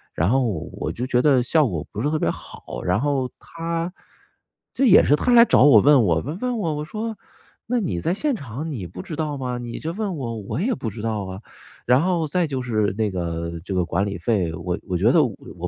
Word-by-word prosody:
然 85 +4 +1
后 130 +3 +3 0.3
我 - - -4
就 125 - -3
觉 125 -1 +2
得， 135 -3 +4
效 150 +3 +3
果 85 -8 -3
不 - - -4
是 145 - +1
特 155 - 0
别 - - 0
好。 - - -7
然 90 +4 +1
后 140 -3 0
他 165 +1 -4 0.8
这 270 - +2
也 215 -5 +7
是 - - +3
他 245 +11 +1
来 235 -1 +9
找 235 - +4
我， 145 0 +8
问 145 -4 +6
我 80 -5 +2
问 155 +8 -6
问 250 0 -1
我， 190 -7 -1
那 155 - -1
我 150 - -4
说： 220 +5 -5 0.5
“那 245 +1 +1
你 95 - -2
在 90 - 0
现 290 +9 0
场 145 - -5
你 105 - -5
不 90 +2 -8
知 155 - -7
道 150 -2 -2
吗？ 125 -2 -3
你 120 -1 -6
这 160 - -4
问 200 0 -3
我， 120 -6 -4
我 110 - -4
也 245 +6 +1
不 120 - -4
知 105 +1 -8
道 110 -2 -2
啊。” 95 +1 -7 0.4
然 125 +3 +4
后 175 -2 +1
再 170 +3 0
就 135 -3 -3
是 110 -5 0
那 110 -2 0
个 85 -2 -3
这 100 - -4
个 90 - +2
管 95 +3 0
理 100 -2 -4
费， 90 -3 0
我 90 +3 -3
我 90 -2 -1
觉 - - +4
得 - - +5
我 85 +1 -7
130 Hz, 260 characters per minute, -23 LUFS, 100-165 Hz, 0.8 s, 来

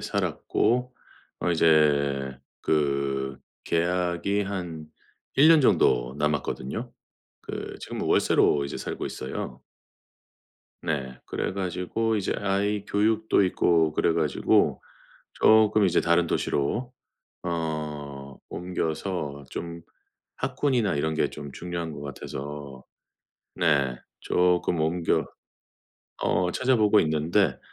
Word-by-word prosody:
살았고 125 +1 0 0.5
어 90 - +1
이제 70 -5 +3 0.2
그 70 -3 0 0.3
계약이 90 +3 0
한 85 -6 -5 0.5
1 140 +3 +7
년 165 -1 +7
정도 65 - +3
남았거든요. 75 - -2 0.5
그 - - -6
지금 - - -5
월세로 70 -1 +3
이제 70 - -5
살고 - - -4
있어요. 65 -1 -6 1.2
네. 70 -6 -3
그래 - - -2
가지고 95 +4 -1
이제 100 -3 -1
아이 100 +1 0
교육도 110 0 +2
있고 85 -3 +2
그래 85 - +2
가지고 75 -4 +2 0.5
쪼끔 110 -1 +5
이제 90 - +3
다른 85 0 +3
도시로 110 - -1 0.5
어 75 -5 -4
옮겨서 80 -4 -3
좀 85 0 -6 0.5
학군이나 125 - 0
이런 80 +2 0
게 - - +1
좀 70 -1 -8
중요한 85 -2 -5
것 70 - -8
같아서 70 -1 -7 0.7
네. 70 -7 +2 0.3
쪼끔 90 -1 +2
옮겨 80 +2 +1 1.0
어 90 +1 +1
찾아보고 110 -4 +4
있는데 80 0 +1
85 Hz, 205 characters per minute, -26 LUFS, 70-100 Hz, 1.2 s, 1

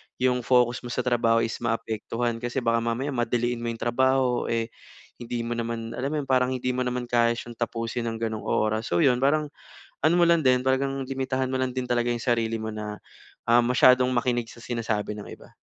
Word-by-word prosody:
yung 125 0 +1
focus 125 -1 +3
mo 120 - -8
sa 125 +1 -2
trabaho 115 -2 +2
is 115 - -2
maapektuhan. 115 0 -2
Kasi 120 +1 -4
baka 115 0 +2
mamaya 125 +5 -1
madaliin 120 -1 0
mo 120 - -3
yung 115 - -6
trabaho, 130 +1 +1
eh, 115 0 -1 0.5
hindi 120 0 -4
mo 115 - -4
naman 115 -1 -4
alam 130 +3 -3
mo 155 - -3
yun? - - -12
Parang 130 -1 +3
hindi 125 0 -1
mo 125 - -3
naman 125 0 -2
kaya 120 -1 +2
siyang 120 0 -7
tapusin 115 0 -2
ng 115 - -4
ganoong 110 -1 -3
oras. 110 +1 0
So, 170 - +2
yun 125 -3 +4
parang 145 +2 +1 0.5
ano 160 - +5
mo 175 - +4
lang 170 -4 +3
din, 125 0 +4
talagang 135 +1 0
limitahan 130 -1 -1
mo 130 - -1
lang 130 -1 -1
din 130 -1 -4
talaga 120 0 +1
yung 120 - -4
sarili 115 -2 0
mo 110 - -3
na, 105 -1 -5 0.5
ah, 120 +1 +6
masyadong 125 +1 +5
makinig 120 -1 0
sa 120 - -13
sinasabi 110 -3 -2
ng 105 - -8
iba. - - -15
120 Hz, 210 wpm, -26 LUFS, 115-130 Hz, 0.5 s, ah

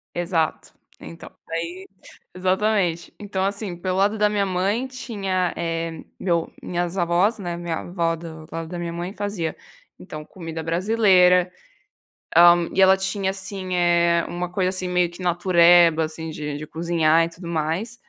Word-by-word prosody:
Exato, 170 -3 -1 0.3
então 165 - -11 0.2
aí, 170 +3 -5 0.5
exatamente, 185 -2 0
então 200 -2 -3
assim 200 -1 -3
pelo 185 +1 -3
lado 205 +3 +2
da 210 -1 +2
minha 205 -1 0
mãe 195 +7 0
tinha, 195 -8 -2
eh, 165 -1 -3 0.2
meu 170 -3 0
minhas 175 +1 -3
avós, 175 +6 +2
né, 175 -3 -4
minha 170 -2 -3
avó 170 -2 -1
do 160 -1 -10
lado 165 0 -5
da 175 +1 -6
minha 170 -1 -4
mãe 175 +2 -4
fazia, 200 -6 -3 0.4
então 155 -4 -8
comida 165 -1 -7
brasileira, 180 0 +3 0.9
hã, 175 0 +7
e 190 - 0
ela 190 0 +7
tinha 190 0 -2
assim, 190 -1 -4
eh, 170 -1 +3
uma 175 0 -4
coisa 185 -1 0
assim 185 -1 -2
meio 180 -1 +1
que 175 +1 -10
natureba 175 -2 +5
assim 160 +1 -5
de 150 -2 -5
de 155 - -7
cozinhar 165 0 +2
e 165 - -6
tudo 170 +1 -11
mais. 170 +8 -2
175 Hz, 155 wpm, -23 LUFS, 165-190 Hz, 0.9 s, hã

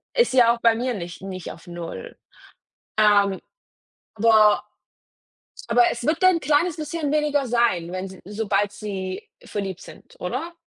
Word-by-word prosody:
Ist 480 - +3
ja 235 -2 +6
auch 235 - -7
bei 230 -1 +4
mir 245 +2 -1
nicht 175 -4 -7
nicht 185 -2 -7
auf 170 - -14
0. 175 - -8 0.8
Ähm, 205 -2 +4 0.8
aber 215 -1 +5 1.0
aber 240 +1 +4
es 235 - -6
wird 320 +4 0
ein 370 -2 +5
kleines 305 +4 +1
bisschen 305 -1 -3
weniger 295 -2 +1
sein, 230 -8 +1
wenn 185 +1 -4
sie 190 0 -12
sobald 205 0 -1
sie 195 -3 -6
verliebt 195 -3 -5
sind, - - -14
oder? 340 +1 -4
220 Hz, 145 wpm, -23 LUFS, 195-285 Hz, 1.0 s, ja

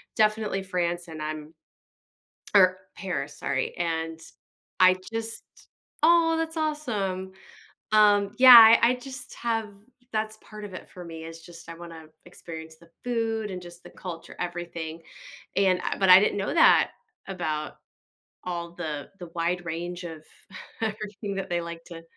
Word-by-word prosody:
definitely 215 -2 +1
France 175 -2 -2
and 160 -1 -8
I'm 155 0 -6 1.0
or, 185 -1 +6 0.2
Paris, 150 -7 -4
sorry, 135 -1 -2
and 165 -1 -2 0.6
I 185 0 +7 0.2
just 225 0 -4 0.6
oh, 330 0 +5
that's 325 0 -3
awesome! 215 -12 -2 0.6
Um, 205 -2 +5
yeah 255 -1 +11 0.3
I 235 - +6
I - - 0
just 255 0 -10
have 225 -2 -2 0.4
that's 215 0 -2
part 215 -1 -10
of 200 - -10
it 185 - -9
for 180 -1 -10
me, 165 -1 -8
is 165 0 -10
just 170 0 -13
I 165 - -7
wanna 165 -2 -10 0.2
experience 160 -2 -10
the 170 +1 -20
food 225 -3 -1
and, 180 -1 -6
just, 175 0 -13
the - - -12
culture 170 -3 -9
everything, 170 -2 -5 0.5
and 190 -2 +3
I - - -2
but, 190 - +3
I 185 +1 +11
didn't 205 0 +1
know 195 - -2
that 330 - +5 0.4
about 155 -5 -3 0.7
all 170 -1 -4
the 155 -4 -5
the 175 - -8
wide 175 +1 -1
range 175 +2 -5
of 160 -2 -8 0.6
everything 210 -1 -4
that 195 - -4
they 175 0 0
like 170 0 -8
to 165 -1 -10
180 Hz, 150 wpm, -26 LUFS, 165-215 Hz, 1.0 s, yeah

